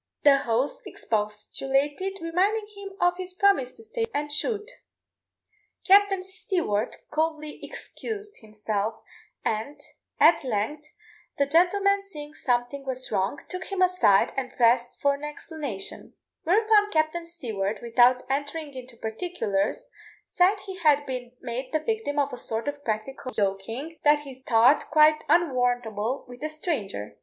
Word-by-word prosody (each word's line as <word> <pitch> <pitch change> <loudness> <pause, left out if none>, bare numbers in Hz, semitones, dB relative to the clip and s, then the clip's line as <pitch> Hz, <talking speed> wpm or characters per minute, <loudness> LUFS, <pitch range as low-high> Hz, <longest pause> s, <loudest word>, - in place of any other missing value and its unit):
The 285 -1 +7
host 250 +1 -1
expostulated, 270 - -1
reminding 380 +6 +1
him 400 -1 -8
of 355 -1 +3
his 370 0 -6
promise 375 -11 +3
to 450 - -12
stay 455 +1 -2
and 295 0 -1
shoot. 420 +7 0 1.2
Captain 395 -1 +5
Stewart 360 - -2 0.2
coldly 310 -1 -2
excused 420 -2 -7
himself, 215 0 -3 0.5
and, 225 +7 -2 0.4
at 325 -1 +6
length, 260 +6 -2 0.5
the 280 - +3
gentleman 395 +6 +3
seeing 300 -7 -9
something 245 +2 -1
was 260 -1 -3
wrong, 195 +6 0
took 365 0 -5
him 390 -2 0
aside, 360 - +4
and 260 -2 -3
pressed 240 0 +3
for 280 0 +3
an 280 +1 -8
explanation; 295 - -6 0.3
whereupon 420 +3 +4
Captain 320 0 0
Stewart, 220 - -3
without 245 +2 +4
entering 285 +2 -3
into 255 -2 -10
particulars, 220 - -2 0.4
said 385 +3 +2
he 385 -1 -7
had 295 -3 +4
been 250 -2 -5
made 255 +1 -4
the 310 - +1
victim 435 -4 -2
of 285 -2 +1
a - - -4
sort 225 +1 -3
of 290 0 -4
practical 245 +4 -3
joking 225 +9 -2
that 295 0 +5
he 265 -3 -11
thought 240 +5 +4
quite 305 0 +5
unwarrantable 245 -6 +1
with 245 +3 -11
a 310 - -1
stranger. 235 - -4
285 Hz, 135 wpm, -26 LUFS, 240-355 Hz, 1.2 s, The